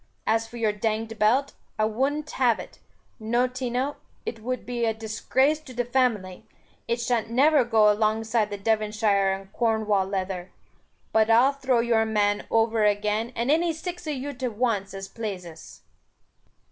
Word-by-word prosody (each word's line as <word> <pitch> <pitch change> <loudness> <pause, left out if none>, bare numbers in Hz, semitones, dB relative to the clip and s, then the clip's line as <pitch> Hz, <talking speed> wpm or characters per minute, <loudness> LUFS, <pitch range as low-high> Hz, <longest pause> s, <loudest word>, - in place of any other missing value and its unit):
As 225 +1 +1
for 235 - -10
your 220 -2 +1
danged 220 +1 -3
belt, 250 +7 +2 0.2
I 215 - +2
wun't 275 +7 -1
have 240 -4 +2
it, - - -10 0.4
no 235 +3 +1
tino, 255 +2 -3 0.3
it 225 - -4
wud 255 +3 -4
be 240 -1 -3
a 225 -1 +1
disgrace 260 +7 +1
to 265 -5 -13
the 245 0 -1
family; 230 -7 0 0.4
it 235 +1 0
shan't 235 -1 0
never 280 +4 +4
go 220 -3 +4
along 215 +1 +1
side 220 -1 0
the 205 - -5
Devonshire 210 -2 +1
and 195 0 -6
Cornwall 215 -4 +1
leather. 190 -2 -3 0.6
But 220 0 +4
I'll 245 +5 +5
throw 265 -3 +1
your 230 -1 +2
man 205 -1 0
over 225 -1 +2
again, 210 +2 +1
and 235 +4 0
any 330 +2 +2
six 350 +1 -7
of 300 - -1
you 280 +2 -5
to 255 0 -3
once 210 -4 -1
as 195 0 -6
plases." 185 -7 -7
225 Hz, 165 wpm, -25 LUFS, 210-250 Hz, 0.6 s, I'll